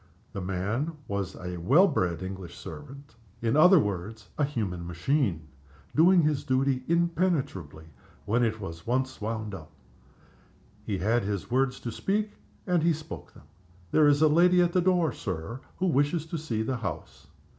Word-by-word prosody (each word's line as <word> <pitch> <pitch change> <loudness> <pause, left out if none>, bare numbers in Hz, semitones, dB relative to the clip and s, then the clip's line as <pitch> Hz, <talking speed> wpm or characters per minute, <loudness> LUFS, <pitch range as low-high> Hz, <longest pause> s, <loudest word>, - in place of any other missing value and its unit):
The 100 - -4
man 100 - -2
was 100 -2 -3
a 90 -1 -6
well 140 - +5
bred 85 - -1
English 95 -2 -7
servant. 140 -3 -10 0.3
In 115 +1 0
other 180 +5 +7
words, 105 - -4
a 150 - 0
human 100 -11 -2
machine, 90 - 0 0.5
doing 170 0 +6
its 150 -2 0
duty 130 0 +1
impenetrably 165 - 0 0.4
when 115 +4 +2
it 110 -1 0
was 85 -3 -8
once 130 +1 -1
wound 110 -1 -3
up. 80 -5 -8 1.1
He 100 - -2
had 115 +6 +1
his 100 +2 -3
words 130 0 +1
to 120 - -4
speak, 210 - -1 0.3
and 180 -3 +2
he 165 +1 +3
spoke 155 +1 -9
them. - - -15 0.5
"There 155 -1 +5
is 145 +1 +4
a - - +7
lady 175 +4 +5
at 175 -1 +3
the 180 - +3
door, 175 -4 +2
Sir, 95 +5 -5 0.2
who 185 - 0
wishes 150 0 +1
to 165 +1 -4
see 115 -8 -2
the 125 +3 -2
house." 110 -6 -6
125 Hz, 165 wpm, -28 LUFS, 95-155 Hz, 1.1 s, other